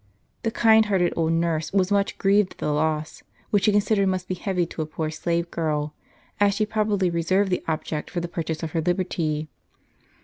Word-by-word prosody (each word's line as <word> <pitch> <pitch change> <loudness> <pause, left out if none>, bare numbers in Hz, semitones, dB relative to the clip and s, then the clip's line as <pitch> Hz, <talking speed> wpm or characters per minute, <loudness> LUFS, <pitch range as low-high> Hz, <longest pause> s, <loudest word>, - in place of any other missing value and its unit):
The 225 - 0
kind 220 -1 +5
hearted 185 -4 +2
old 165 -1 +1
nurse 165 -2 0
was 190 -1 +1
umch 200 -1 +1
grieved 200 0 +3
at - - -32
the 150 - -1
loss. 155 0 -1 0.3
which 200 -2 +3
she 210 - +5
considered 205 -1 +2
must 185 -1 -1
be - - -2
heavy 180 -1 -1
to 165 - -6
a 155 - -3
poor 155 0 -3
slave 170 +2 -2
girl, 150 -2 -1 0.5
as 200 -1 +4
she 215 0 +1
probably 210 -4 0
reserved 185 +4 +1
that 180 - 0
object 155 -1 -3
for 180 - -3
the 170 - -3
purchase 165 -2 -4
of 160 - -3
her 165 - 0
liberty. 165 -3 -1
175 Hz, 200 wpm, -24 LUFS, 160-200 Hz, 0.5 s, kind